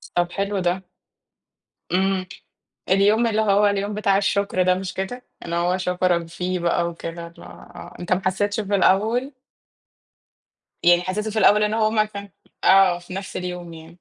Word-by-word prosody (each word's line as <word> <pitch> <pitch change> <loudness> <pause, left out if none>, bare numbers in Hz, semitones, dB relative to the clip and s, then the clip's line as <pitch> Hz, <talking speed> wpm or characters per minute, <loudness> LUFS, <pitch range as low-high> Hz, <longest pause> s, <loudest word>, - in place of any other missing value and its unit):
طَب 175 0 +1
حلو 200 0 -2
ده. 180 +1 -1 1.1
إمم. 190 0 +1 0.6
اليوم 205 +5 +3
اللي 220 -1 +1
هو 205 0 +3
اليوم 200 +1 -1
بتاع 200 -2 +2
الشكر 200 -2 0
ده، 185 0 +3
مش 185 0 -5
كده؟ 245 +7 -5 0.2
إن 170 - -5
هو 175 +2 +1
شكرَك 180 -2 0
فيه 180 +2 -3
بقى 170 0 0
وكده 170 0 -7
اللي 170 - -15
هو 175 - -12
أنت 175 +1 -1
ما 185 - -1
حسيتش 205 +3 0
في 205 -1 -1
الأول؟ 220 +8 +2 1.5
يعني 175 0 +5
حسيته 210 +4 -3
في 220 - -1
الأول 210 +1 +5
إن 210 +1 0
هو 220 -1 +2
ما 215 -1 +2
كان 200 -1 -9 0.3
آه، 190 -2 +5
في 180 +1 -11
نفْس 195 0 -6
اليوم 180 -2 -6
يعني. 160 +1 -13
190 Hz, 165 wpm, -22 LUFS, 175-205 Hz, 1.5 s, يعني